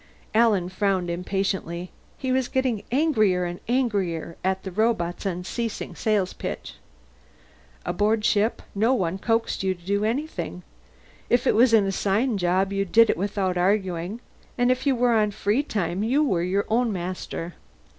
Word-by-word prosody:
Alan 215 -5 +3
frowned 185 -2 0
impatiently. 180 -1 -2 0.3
He 260 - -2
was 260 -1 +1
getting 255 -5 0
angrier 215 - +2
and 175 0 -5
angrier 200 -10 -1
at 190 0 0
the 190 - -5
robot's 200 -3 0
unceasing 195 +5 -4
sales 210 -4 0
pitch. - - -6 1.1
Aboard 210 +4 +1
ship, 215 +3 +1
no 225 +6 +2
one 185 -3 -1
coaxed 225 +2 0
you 190 -1 0
to 175 -1 -21
do 200 +2 0
anything; 235 - -3 0.7
if 240 - +3
it - - +4
was 235 +3 +5
an 220 -3 +5
assigned 200 +4 0
job, 185 +2 +1
you 195 0 +1
did 225 +4 +5
it - - -2
without 190 -1 -1
arguing, 190 +2 0 0.4
and 245 0 +3
if 255 +3 -1
you 270 - +4
were 245 0 +2
on 215 -2 +3
free 205 +5 0
time 195 - -2
you 260 +8 +2
were 190 - +1
your 190 +3 0
own 235 +1 +1
master. 175 -2 -5
200 Hz, 155 wpm, -25 LUFS, 185-230 Hz, 1.1 s, was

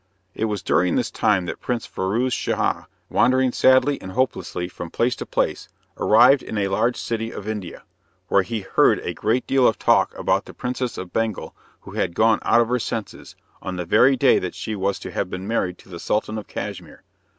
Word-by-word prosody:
It 110 - -2
was 105 -4 -3
during 90 -1 +2
this - - 0
time 95 -4 +1
that - - -6
Prince 120 -2 -2
Firouz 115 +7 -1
Schah, - - -1 0.2
wandering 130 0 +3
sadly 130 +3 +3
and 95 - -8
hopelessly 125 -8 -1
from 85 -1 -8
place 120 +7 0
to - - -6
place, - - -1 0.3
arrived 125 +5 +5
in 110 - -6
a 100 -1 0
large 115 +5 +1
city 115 -1 -3
of 105 - -8
India, 105 -5 -5 0.4
where 100 - +4
he 105 +4 -4
heard 95 - +3
a - - -4
great 115 +4 0
deal 135 -2 +3
of 110 - +1
talk - - +2
about - - 0
the - - -12
Princess 125 0 -3
of 95 -1 -7
Bengal 115 -3 -2 0.3
who - - -12
had 85 - -2
gone 110 0 +4
out 120 - +4
of 115 - -1
her 125 0 +1
senses, 110 -1 -5 0.3
on 95 - -5
the 90 -1 -4
very 125 +9 +4
day 130 +1 +4
that 90 - -5
she 110 - -4
was 100 0 -1
to - - -8
have - - -2
been 90 +2 -6
married 90 -5 -1
to - - -19
the 85 -3 -9
Sultan 110 +3 -1
of 105 - -11
Cashmere. - - -7
110 Hz, 205 wpm, -22 LUFS, 95-125 Hz, 0.4 s, arrived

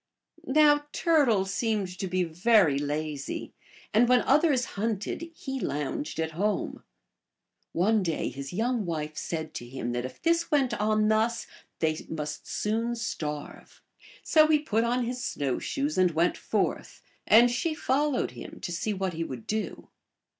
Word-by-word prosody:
Now 295 +1 +4
Turtle 270 - +3
seemed 195 -2 -2
to 190 - -2
be 185 0 +1
very 175 -3 +3
lazy, 145 0 -3 0.4
and 235 +3 +4
when 250 -1 +5
others 280 -3 +3
hunted 220 - -2
he 270 -3 -5
lounged 150 - -3
at 160 0 -1
home. 200 +6 -2 0.9
One 210 +5 +2
day 165 -4 -1
his 135 +2 -7
young 225 +1 -1
wife 155 -2 -3
said 160 -1 -4
to 120 - -6
him 125 -2 -4
that 120 0 -2
if 130 0 -7
this 335 0 +1
went 275 -6 +2
on 215 -1 +2
thus 225 +2 +1 0.3
they 155 -1 0
must 150 -2 -5
soon 230 +3 -1
starve. 150 -10 -5 0.4
So 310 -1 +5
he 310 -1 +5
put 230 -7 0
on 240 +1 +1
his 250 +1 -4
snow 140 - -1
shoes 285 -4 -2
and 185 -1 +5
went 170 +2 +1
forth, - - -2 0.2
and 235 +3 +7
she 310 +6 -1
followed 285 0 0
him - - -10
to 175 - -4
see 205 +5 -2
what 190 -1 -2
he 165 +1 -2
would 130 -7 -7
do. 215 0 -4
210 Hz, 155 wpm, -28 LUFS, 160-250 Hz, 0.9 s, and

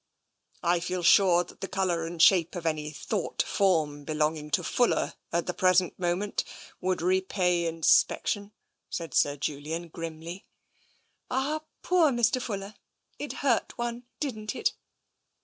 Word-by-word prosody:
*' - - -37
I 175 - +2
feel 175 +1 -3
sure 175 0 +6
that 175 - -16
the 195 - -3
colour 180 -4 -1
and 170 0 -7
shape 175 0 +5
of 175 -2 -5
any 155 -2 -1
thought 180 +5 -2
form 155 -7 +1
belonging 150 0 -1
to 180 +4 +1
Fuller 245 +8 +1 0.2
at 170 0 0
the 180 - -2
present 185 0 +2
moment 180 +3 -1 0.4
would 185 -2 -1
repay 180 -1 +1
inspection," 185 +5 +2 0.4
said 165 -2 -5
Sir 145 0 +3
Julian 155 +4 -4
grimly. 165 +3 -7 0.8
"Ah, 280 +4 -1 0.2
poor 355 -4 +4
Mr. 240 0 +2
Fuller! 200 -4 -5 0.5
It 290 - -4
hurt 240 -5 +1
one, 240 0 -4
didnt 220 -8 -3
it? - - 0
180 Hz, 140 wpm, -28 LUFS, 165-205 Hz, 0.8 s, sure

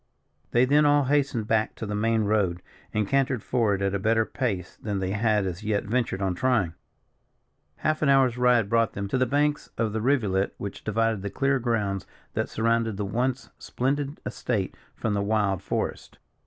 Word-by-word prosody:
They 120 +2 +4
then 145 +3 +4
all 145 0 +4
hastened 135 -4 +1
back 110 -1 +1
to - - -5
the 105 - -4
main 110 +1 +1
road, 100 -5 0 0.3
and 105 -2 0
cantered 135 -2 +1
forward 105 -6 +1
at 100 0 0
a 100 - 0
better 110 +2 +2
pace 100 -11 -3
than 105 -2 -3
they 95 -1 -2
had 105 0 +1
as 90 0 -4
yet 105 -1 0
ventured 110 -3 -1
on 95 -1 +1
trying. 105 -5 +1 1.0
Half 155 0 -1
an 150 - +3
hour's 135 -3 +4
ride 125 -3 +3
brought 115 +1 +2
them 100 0 -4
to 130 - 0
the 130 - +2
banks 145 +3 0
of 110 -2 0
the 110 - -1
rivulet 105 -7 +1
which 100 - -6
divided 110 -1 0
the 100 - -3
clear 135 +4 +1
grounds 105 -6 -1 0.3
that - - -1
surrounded 115 -2 0
the 105 - -2
once 125 +5 -2
splendid 140 +3 -2
estate 105 -6 -2 0.2
from 110 - -2
the 100 - 0
wild 100 -2 +1
forest. - - -3
110 Hz, 185 wpm, -26 LUFS, 100-130 Hz, 1.0 s, They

